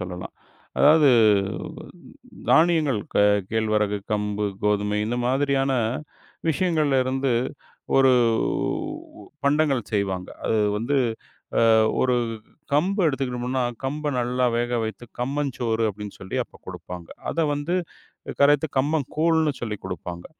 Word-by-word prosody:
சொல்லலாம். 90 -1 -7 0.4
அதாவது 150 0 +6 1.4
தானியங்கள், 160 -8 +4
க - - 0 0.3
கேழ்வரகு, 105 -2 +1
கம்பு, 105 0 -1 0.2
கோதுமை 105 0 +1
இந்த 120 - -2
மாதிரியான 135 +1 +1 0.8
விஷயங்கள்ல 155 -4 +1
இருந்து 130 0 0 0.6
ஒருவ் 125 -4 +4 1.0
பண்டங்கள் 140 -5 +2
செய்வாங்க. 95 -3 -1 0.2
அது 110 - +1 0.2
வந்து, 120 +7 0 0.8
அ - - +6 0.3
ஒரு 125 -1 +3 0.6
கம்பு 190 +7 +2
எடுத்துக்கிட்டம்முனா 130 -2 -1 0.2
கம்பை 150 +3 -2
நல்லா 125 +1 0
வேக 120 0 0
வைத்து 110 +2 -6 0.2
கம்மஞ்சோறு 125 -4 -1
அப்டின்னு 105 0 -8
சொல்லி 95 - -4
அப்பக் - - -21
கொடுப்பாங்க. 90 -2 -8 0.2
அதை 165 - 0
வந்து 145 +5 -2 0.7
கரைத்து 145 +2 +4
கம்பங்கூழ்னு 155 +2 +1
சொல்லி 110 -3 -3
குடுப்பாங்க. 90 -1 -6
130 Hz, 105 wpm, -24 LUFS, 105-145 Hz, 1.4 s, அதாவது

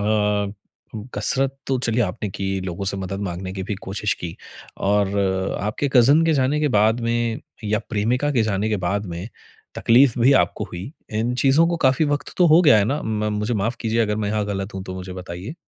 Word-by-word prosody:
अ, 105 -1 +1 0.6
कसरत 135 -1 +1
तो 130 -1 0
चलिए 120 -1 0
आपने 100 +1 -3
की, 95 0 -3
लोगों 95 +1 -4
से 100 0 -1
मदद 95 +1 -4
माँगने 95 0 -4
की 95 0 -5
भी 100 +2 -3
कोशिश 100 +2 -2
की 85 -2 -5 0.4
और 100 0 +1 0.4
आपके 105 +7 -1
कज़िन 140 +6 +5
के 165 - +3
जाने 140 +2 +1
के 150 - +2
बाद 110 +3 +3
में 115 -1 -1 0.2
या 105 +1 +1
प्रेमिका 120 +6 0
के 120 -5 +2
जाने 105 0 0
के 105 - 0
बाद 100 +3 -1
में 85 +5 -6 0.5
तकलीफ़ 125 +1 +4
भी 130 +4 +6
आपको - - -4
हुई। 95 - -8 0.3
इन 120 +2 0
चीज़ों 140 +6 +4
को 170 - 0
काफ़ी 130 +4 +3
वक़्त 145 0 -2
तो 180 - +5
हो 160 +2 +6
गया 150 -8 +7
है 100 - +3
ना? 140 +8 -1
म 105 -1 -1
मुझे 105 +3 -1
माफ़ 110 +4 -1
कीजिए, 115 0 0
अगर 105 -1 -1
मैं 105 -2 -2
यहाँ 105 0 0
गलत 95 0 -4
हूँ, 95 - -4
तो 95 - -6
मुझे 95 0 -7
बताइए। 90 - -7
105 Hz, 210 wpm, -22 LUFS, 100-125 Hz, 0.6 s, गया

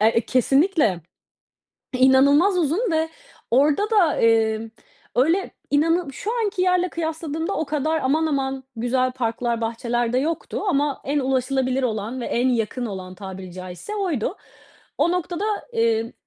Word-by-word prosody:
Er 220 +2 +4
E, 230 - +4
kesinlikle 270 - +2 1.0
inanılmaz 280 +8 +5
uzun 350 - +1
ve 320 0 +1 0.4
orada 295 - +3
da, 380 -8 +3
emm, 225 -1 +2 0.4
öyle 330 +10 +2 0.2
inanı 320 +1 +2
şu 410 - -4
anki 405 -4 0
yerle 365 0 +2
kıyasladığımda 320 +1 -3
o 320 - -1
kadar 310 +2 -1
aman 310 +5 +2
aman 270 -2 -2
güzel 255 +2 0
parklar, 235 -1 -2
bahçeler 235 +1 -1
de 255 - +2
yoktu 315 +5 -2
ama 290 -4 +1
en 285 +2 0
ulaşılabilir 260 0 0
olan 225 +1 -2
ve - - -4
en 245 +2 +1
yakın 240 +1 -1
olan 185 -3 -7
tabiri 190 -1 -8
caizse 185 - -7
oydu. 365 - -1 0.6
O 335 +4 +3
noktada, 360 +1 -2 0.3
eee, 230 0 +1
265 Hz, 140 wpm, -23 LUFS, 230-320 Hz, 1.0 s, inanılmaz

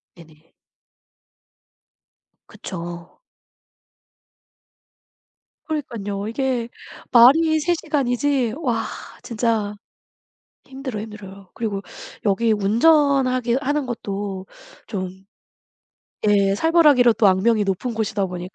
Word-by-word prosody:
네네. 160 -2 -18 2.0
그쵸. 175 -1 -8 2.4
그러니깐요. 215 -10 -4
이게 245 0 -2 0.4
말이 310 +7 +6
3 345 +3 +1
시간이지 275 -5 0
와 240 -7 0 0.4
진짜 225 -3 -1 0.9
힘들어, 265 -5 -6
힘들어요. 200 -3 -10
그리고 205 -4 -3 0.4
여기 220 +2 +2
운전하게 255 +2 +3
하는 290 0 -1
것도 200 -4 -5 0.4
좀 190 -2 -6 1.0
예 200 -2 +3
살벌하기로 295 -4 +4
또 220 - +3
악명이 205 +3 +3
높은 195 +5 -2
곳이다 210 -3 -1
보니까 180 0 -7
225 Hz, 190 characters per minute, -21 LUFS, 195-265 Hz, 2.4 s, 말이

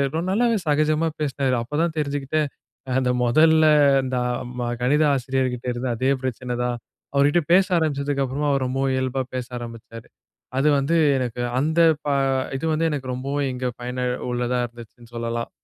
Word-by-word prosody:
ஒரு 165 - 0
நல்லாவே 230 +2 +2
சகஜமா 155 +2 +2
பேசுனாரு. 135 -3 0
அப்போ 130 +5 -7
தான் 170 -2 -1
தெரிஞ்சுக்கிட்டேன். 145 +1 -1 0.5
அந்த 130 -1 +1
மொதல்ல 155 +6 +5 0.4
இந்த 130 0 -3
அ - - 0 0.3
ம - - -1 0.2
கணித 145 +5 +3
ஆசிரியர்கிட்ட 130 -1 -2
இருந்த 125 +2 -3
அதே 130 +3 +1
பிரச்சனை 125 0 -3
தான், 125 0 -1 0.4
அவர்கிட்ட 145 +5 +4
பேச 190 +1 +6
ஆரம்பிச்சதுக்கு 140 -3 0
அப்புறமா 140 +3 -2
அவர் 135 -2 +1
ரொம்பவும் 135 +1 0
இயல்பா 130 0 -1
பேச 125 -1 -3
ஆரம்பிச்சாரு. 115 -1 -10 0.5
அது 140 +3 +2
வந்து 145 +5 0 0.2
எனக்கு 125 -1 -3 0.2
அந்த 160 +4 0 0.3
ப - - -4 0.5
இது 135 - -4
வந்து 165 +1 +1
எனக்கு 130 -3 -3
ரொம்பவும் 140 +2 -2
இங்க 125 0 -3
பயனா 125 +1 -3 0.3
உள்ளதா 125 0 -1
இருந்துச்சுன்னு 120 0 -15
சொல்லலாம். 115 0 -3
135 Hz, 155 wpm, -23 LUFS, 125-150 Hz, 0.5 s, பேச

